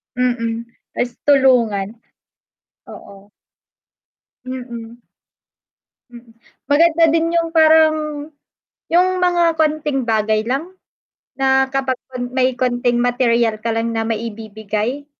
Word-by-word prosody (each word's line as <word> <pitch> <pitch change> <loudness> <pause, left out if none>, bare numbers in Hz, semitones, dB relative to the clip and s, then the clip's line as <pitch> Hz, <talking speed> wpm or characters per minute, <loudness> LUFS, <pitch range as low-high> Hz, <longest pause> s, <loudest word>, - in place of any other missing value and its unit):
Mm. 235 -2 -1 0.3
Ta's 245 - -1
tulungan. 235 -7 +2 0.9
Oo. 200 +1 -13 1.2
Mm. 240 -3 -8 1.1
Mm. 235 -1 -14 0.4
Maganda 330 +2 +4
din 330 +1 +1
yung 330 -1 0
parang 315 -1 +5 1.0
yung 360 +2 +5
mga 345 -2 +2
konting 300 -4 0
bagay 220 -1 0
lang 275 +9 -2 0.7
na 265 0 +3
kapag 265 -1 -1 0.4
may 260 0 +2
konting 245 -1 0
material 240 -2 +1
ka 230 - 0
lang 225 0 -1
na 225 - -1
maibibigay. 220 +3 -4
250 Hz, 95 wpm, -18 LUFS, 230-295 Hz, 1.2 s, parang